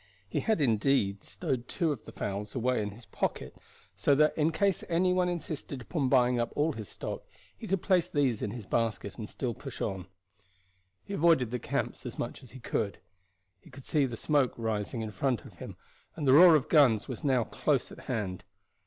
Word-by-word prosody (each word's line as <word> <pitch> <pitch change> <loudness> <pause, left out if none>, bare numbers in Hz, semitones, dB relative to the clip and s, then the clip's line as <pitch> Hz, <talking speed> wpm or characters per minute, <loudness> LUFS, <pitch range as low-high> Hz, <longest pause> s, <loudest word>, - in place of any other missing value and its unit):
He - - -1
had 220 -5 +1
indeed 110 -5 +2
stowed 130 -8 -3
two 170 -4 0
of 135 -7 -5
the - - -9
fowls 100 +3 -4
away 125 -1 +1
in 105 - -2
his 110 +3 -12
pocket - - -3 0.4
so 120 +9 +3
that 150 +2 +4
in 155 +1 +2
case 195 +3 +1
any 180 +2 +3
one 180 -1 +2
insisted 155 -5 -5
upon 135 +2 -1
buying 125 -2 +4
up 120 - -1
all 150 +2 +1
his 110 -5 -7
stock - - -5 0.3
he 225 - -9
could 195 -3 0
place 185 -4 +3
these 135 -7 +1
in - - -1
his 110 0 -7
basket 115 -1 -1
and 105 - -5
still 125 -3 -3
push 135 0 -9
on. 95 -4 -3 1.0
He 200 - -7
avoided 160 - +3
the 125 - -2
camps - - -3
as - - -7
much - - -4
as 130 - -14
he 130 +4 -11
could. 105 -4 -2 0.6
He - - -18
could 130 0 -13
see 145 -3 +2
the 120 -2 -6
smoke 145 -2 +2
rising 110 +1 -2
in 110 - -5
front 125 0 -1
of - - -12
him, - - -8 0.4
and 150 -3 -3
the 130 - +7
roar 170 +2 +9
of 150 -3 +1
guns 130 -9 +4
was 130 - -6
now 130 -4 +3
close - - 0
at - - -11
hand. 105 -7 -2
130 Hz, 205 wpm, -30 LUFS, 110-155 Hz, 1.0 s, roar